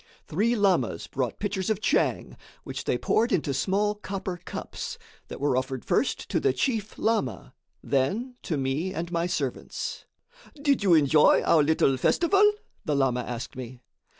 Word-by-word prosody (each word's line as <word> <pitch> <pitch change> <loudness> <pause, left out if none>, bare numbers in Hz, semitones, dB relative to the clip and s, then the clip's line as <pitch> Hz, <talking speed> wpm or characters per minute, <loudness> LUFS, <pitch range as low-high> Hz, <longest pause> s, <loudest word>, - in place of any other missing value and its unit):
Three 220 +9 +1
lamas 190 - +1
brought 130 -4 -3
pitchers 200 -2 -2
of 215 -3 +1
tchang, - - 0 0.3
which - - -6
they - - +1
poured 235 +3 +1
into 150 -5 +1
small 205 +8 +1
copper 190 -3 -5
cups, - - -6 0.3
that - - -8
were 140 -2 +1
offered 130 -1 -2
first - - 0
to - - +1
the - - +2
chief 215 - -2
lama, 220 - -1 0.3
then 195 - 0
to 155 - -2
me 140 +8 -2
and 170 +1 -4
my 170 0 0
servants. 180 - -4 0.5
"Did 285 -4 +2
you 190 -4 +5
enjoy 150 0 +5
our 160 - +4
little 145 -3 +2
festival?" 390 - +4 0.3
the 150 - 0
lama 135 -3 +2
asked 120 0 -6
me. 125 -1 -8
170 Hz, 155 wpm, -26 LUFS, 135-210 Hz, 0.5 s, you